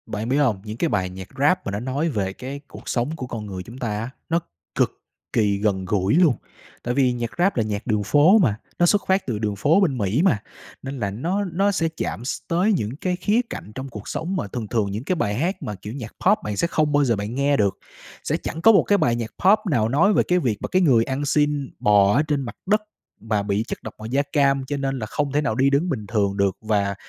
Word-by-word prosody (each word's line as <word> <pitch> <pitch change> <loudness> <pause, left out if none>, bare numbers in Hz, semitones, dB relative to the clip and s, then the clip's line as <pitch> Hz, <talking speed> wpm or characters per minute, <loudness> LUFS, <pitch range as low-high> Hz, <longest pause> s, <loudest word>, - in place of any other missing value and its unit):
Bạn 110 +3 -4
biết 135 - +2
hông, 120 -10 +2
những 110 +1 -7
cái 165 - 0
bài 95 -6 0
nhạc 95 +1 -9
rap 145 +6 +3
mà - - -2
nó 100 - -2
nói 135 +7 -1
về 100 -8 -2
cái 135 +6 -7
cuộc - - -10
sống 130 +6 -1
của 130 -5 -6
con 115 -3 -5
người 95 -3 -6
chúng 115 +6 -11
ta 125 - -3
á, 115 +3 -4 0.2
nó 165 +1 +2 0.4
cực - - 0 0.3
kỳ 105 -3 +2
gần 100 -2 0
gũi 95 0 +1
luôn. 165 -7 +5 0.5
Tại 120 - -1
vì 130 -2 +3
nhạc 120 -1 -3
rap 180 0 +2
là 115 - +3
nhạc 105 +1 -4
đường 105 -3 +1
phố 150 - +5
mà, 140 - +3 0.2
nó 175 - +5
xuất 200 +3 +3
phát 190 +1 +2
từ 115 -5 -2
đường 105 -2 -1
phố 150 - +3
bên 150 -9 +2
Mỹ 105 +6 +1
mà, 170 - +3 0.4
nên 135 0 -6
là 100 -3 -1
nó 175 - -1
nó 195 +2 +1
sẽ 165 -4 0
chạm 90 +9 -3
s - - -2
tới 185 +6 +2
những 115 - -2
cái 180 -1 0
khía 205 +6 +2
cạnh 100 - -7
trong 130 +1 -5
cuộc 105 -4 -9
sống 180 +4 -3
mà 110 - -2
thường 110 +1 -5
thường 105 -3 0
những 105 +4 -4
cái 185 - 0
bài 105 -11 -1
hát 170 - -1
mà, 105 - -4
kiểu, 105 +3 -8
nhạc 120 -5 -7
pop 205 +3 +6
bạn 105 -1 -3
sẽ 170 - +2
không 155 -3 +1
bao 145 0 +3
giờ 120 -4 +2
bạn 105 +3 -4
nghe 140 +1 +2
được. 100 -2 +1 0.5
Sẽ - - 0
chẳng 165 - -5
có 225 - +8
một 200 - +5
cái 205 - +3
bài 150 -10 +2
nhạc 115 -1 -4
pop 205 +3 +7
nào 110 -5 +2
nói 170 - +4
về - - +3
cái 180 0 +2
việc 120 - 0
mà - - -2
cái 185 - +2
người 130 -10 +5
ăn 135 +3 -2
xin 145 -1 +1
bò 100 -1 +4
ở 145 - +4
trên 145 -2 0
mặt 125 - -6
đất 210 +3 +2 0.4
mà 110 -2 0
bị 100 +1 0
chất - - -6
độc - - -7
màu 110 - -8
da 130 +5 +1
cam 140 -3 +3
cho 145 +2 -3
nên 135 -1 -2
là 110 - -3
không 145 +6 -2
thể 145 +2 +1
nào 140 -7 -1
đi 135 +3 +3
đứng 145 +6 +1
bình 115 -9 -3
thường 100 -3 0
được, 100 -1 +1
và 100 -2 0
130 Hz, 270 wpm, -23 LUFS, 105-155 Hz, 0.5 s, có